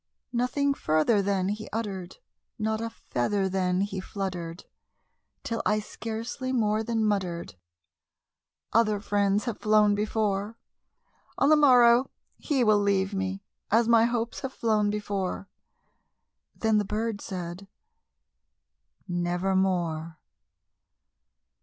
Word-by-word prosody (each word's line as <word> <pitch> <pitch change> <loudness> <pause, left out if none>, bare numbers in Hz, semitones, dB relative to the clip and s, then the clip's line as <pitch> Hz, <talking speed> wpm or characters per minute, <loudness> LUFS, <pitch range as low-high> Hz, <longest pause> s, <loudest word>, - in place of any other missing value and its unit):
Nothing 255 +4 +1
further 155 - +2
then 195 -1 0
he 215 +1 -4
uttered 195 -5 -4 0.4
not 220 0 -1
a 230 - -2
feather 195 - -1
then 185 -1 0
he 195 -1 -2
fluttered 185 -3 -5 0.8
Till 230 -1 -2
I 215 0 +2
scarcely 230 +4 -5
more 215 -4 +1
than 225 -1 0
muttered, 185 -5 -1 1.2
"Other 215 -2 +3
friends 205 0 +1
have 235 -4 -3
flown 210 -1 +4
before 210 0 -1 0.8
On - - +3
the 310 - +7
morrow 250 -4 +6 0.3
he 275 -5 0
will 215 -2 +4
leave 200 -1 +1
me, 195 0 -3 0.3
as 225 +2 +3
my 230 -1 +5
hopes 235 -1 -2
have 265 -1 -5
flown 215 -2 +1
before." 200 -2 -3 1.1
Then 220 -1 +2
the - - +1
bird 215 +1 -3
said, 180 +1 -6 1.4
"Nevermore." 175 -2 0
210 Hz, 110 wpm, -27 LUFS, 190-225 Hz, 1.4 s, the